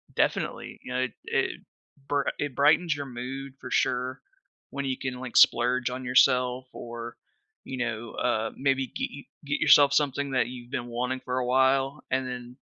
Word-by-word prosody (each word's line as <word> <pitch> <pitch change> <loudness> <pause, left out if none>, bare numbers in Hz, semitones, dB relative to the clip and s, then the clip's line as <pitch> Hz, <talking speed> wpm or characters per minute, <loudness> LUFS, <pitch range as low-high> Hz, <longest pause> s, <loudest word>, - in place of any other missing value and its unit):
Definitely. - - -1
You 125 - -6
know, 130 - 0
it 125 - -4
it - - -1 0.5
bri 145 -1 +1
it 145 -3 -3
brightens 150 +2 +4
your 145 -1 -5
mood 135 +2 -6
for 125 - -9
sure 125 +1 0 0.5
when 140 0 -4
you 130 -1 -1
can, 125 -2 -4
like, 130 -2 -7
splurge 125 +1 +5
on 130 0 -5
yourself 125 0 +3
or, 120 0 -7 0.5
you 130 - -5
know, 120 -2 -3
uh, 115 -2 0
maybe 135 -1 +1
get - - -4
y 140 - -10 0.2
get 145 +1 -1
yourself 140 -1 +6
something 140 -1 +1
that 130 -2 +2
you've 125 -1 -9
been 120 -3 -3
wanting 125 +2 -2
for 130 0 -1
a 125 - -1
while 135 +3 +2
and 130 0 0
then, 125 0 -7
130 Hz, 180 wpm, -27 LUFS, 125-135 Hz, 0.5 s, yourself